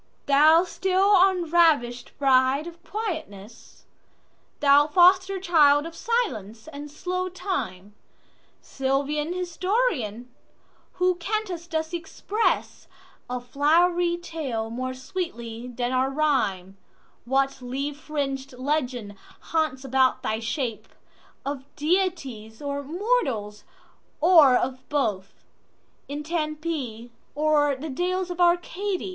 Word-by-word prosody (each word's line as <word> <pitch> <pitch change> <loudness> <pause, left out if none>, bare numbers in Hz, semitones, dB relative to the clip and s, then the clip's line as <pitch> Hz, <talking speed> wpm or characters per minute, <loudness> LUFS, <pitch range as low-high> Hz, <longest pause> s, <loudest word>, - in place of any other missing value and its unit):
THOU 310 +4 +6
still 380 +2 +2
unravish'd 330 -10 +2
bride 265 +1 +3
of 340 0 -11
quietness, 310 - -7 0.7
Thou 290 0 +5
foster 370 +4 +4
child 305 -5 +4
of 330 - -7
silence 275 - -2
and 295 -1 -8
slow 365 +5 -3
time, 210 - -4 0.7
Sylvan 280 +4 -1
historian, 350 - -1 0.6
who 365 0 +2
canst 360 -2 -3
thus 320 -1 -2
expressA 390 +6 -2 0.6
flowery 340 +6 +2
tale 290 -10 -4
more 255 +2 -4
sweetly 245 -6 -5
than 245 0 -3
our 260 +1 +1
rhyme:What 265 0 -2
leaf 275 +4 -3
fring'd 275 -3 -3
legend 250 -6 -2 0.4
haunts 310 -5 0
about 265 0 +2
thy 220 - -1
shapeOf 255 +3 -6
deities 290 - -1
or 285 -1 -3
mortals, 280 - -1 0.5
or 315 -6 +7
of 255 +1 -1
both, 215 -10 -2 0.6
In 290 +1 -5
Tempe 305 -7 -3 0.2
or 295 -1 +2
the 295 +3 -6
dales 360 +4 -1
of 355 0 -3
Arcady? 355 +3 +1
295 Hz, 95 wpm, -25 LUFS, 255-350 Hz, 0.7 s, or